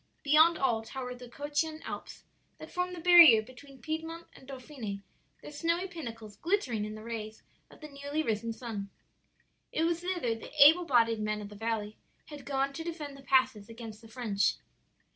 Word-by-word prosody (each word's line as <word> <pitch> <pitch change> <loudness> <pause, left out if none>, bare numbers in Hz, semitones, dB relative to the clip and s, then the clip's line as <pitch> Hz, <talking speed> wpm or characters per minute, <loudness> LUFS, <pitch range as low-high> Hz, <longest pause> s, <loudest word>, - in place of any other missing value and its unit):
Beyond 315 +3 +5
all 240 -5 +1
towered 250 +2 -7
the 250 -1 -10
Cottian 295 +4 -2
Alps, - - -8 0.3
that - - -11
form 360 0 -2
the 355 - -7
barrier 335 -10 +8
between 255 +3 -15
Piedmont 325 +2 -4
and 260 - -16
Dauphiny, 250 -7 -7 0.4
their - - -9
snowy 335 +5 -1
pinnacles 230 - -8
glittering 280 - 0
in 215 0 -6
the 215 - -10
rays 220 -1 -6 0.3
of - - -18
the 305 - -7
newly 285 +2 -3
risen 230 -2 -1
sun. 220 -4 -6 0.8
"It 320 - 0
was 335 0 +1
thither 355 -10 -1
the 225 - -9
able 315 +5 +8
bodied 230 -5 +3
men 215 0 -2
of 205 -1 -7
the 210 - -11
valley 215 -1 -3 0.3
had 290 -3 -10
gone 275 0 -1
to 325 - -5
defend 315 -4 -6
the 275 - -13
passes 255 -5 +2
against 225 -2 -9
the 225 - -14
French. 220 -4 0
265 Hz, 180 wpm, -30 LUFS, 225-315 Hz, 0.8 s, barrier